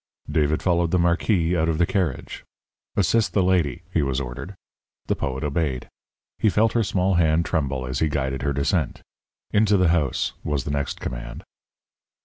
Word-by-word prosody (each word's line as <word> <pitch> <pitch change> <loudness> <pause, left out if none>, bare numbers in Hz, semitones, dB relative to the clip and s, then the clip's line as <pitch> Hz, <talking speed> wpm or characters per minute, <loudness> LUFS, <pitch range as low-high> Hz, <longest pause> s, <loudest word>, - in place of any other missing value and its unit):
David 75 0 +1
followed 85 -2 +2
the 90 - +2
Marquis 85 0 +2
out 80 -1 +1
of 80 - 0
the 85 - +3
carriage. 85 -8 -2 0.5
"Assist 115 -2 +2
the 100 - +3
lady," 90 -8 +1
he - - +3
was 70 -1 0
ordered. 70 +9 -6 0.5
The - - 0
poet 65 -1 -3
obeyed. 75 -3 -1 0.5
He 110 - +4
felt 110 +2 +2
her 115 - +3
small 95 -2 +1
hand 85 -1 +3
tremble 70 -5 -1
as 65 0 -3
he 80 - +2
guided 65 -2 -2
her 70 +1 0
descent. 70 +2 -1 0.5
"Into 105 -1 +4
the 90 -3 +3
house," 80 -6 +1
was 75 -3 -1
the 70 - -4
next 70 -1 -2
command. - - -6
80 Hz, 170 wpm, -24 LUFS, 70-90 Hz, 0.5 s, He